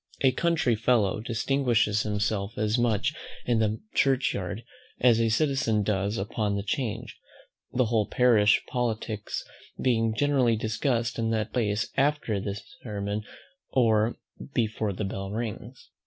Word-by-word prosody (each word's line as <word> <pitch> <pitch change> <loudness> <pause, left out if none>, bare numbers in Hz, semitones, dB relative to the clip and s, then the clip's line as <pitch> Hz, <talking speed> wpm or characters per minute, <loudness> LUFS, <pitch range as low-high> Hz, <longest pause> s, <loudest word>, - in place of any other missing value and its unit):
A 130 - +5
country 160 -4 +1
fellow 110 -3 +2
distinguishes 115 -2 +1
himself 105 0 -1
as 105 +1 +1
much 120 -4 +1 0.3
in 120 -2 +2
the 110 0 +1
Church 135 -1 +2
yard, 95 +4 -4 0.4
as 120 -2 +5
a 115 - +2
citizen 125 -3 +1
does 100 +1 0
upon 105 +1 -1
the 100 - -2
Change, 115 +1 -3 0.5
the 125 0 +2
whole 110 -2 +1
parish 110 -4 +4
politicks 110 -3 -2 0.4
being 115 -3 +1
generally 135 -4 +3
discussed 115 +2 -1
in 115 0 0
that 110 -2 -1
place 110 -2 0
either 135 - +5
after 105 -7 -2 0.4
sermon 105 -2 -3 0.5
or 115 -2 +3 0.4
before 110 -3 0
the 100 +2 -3
bell 95 0 -4
rings. 115 +3 -6
110 Hz, 135 wpm, -27 LUFS, 105-120 Hz, 0.5 s, A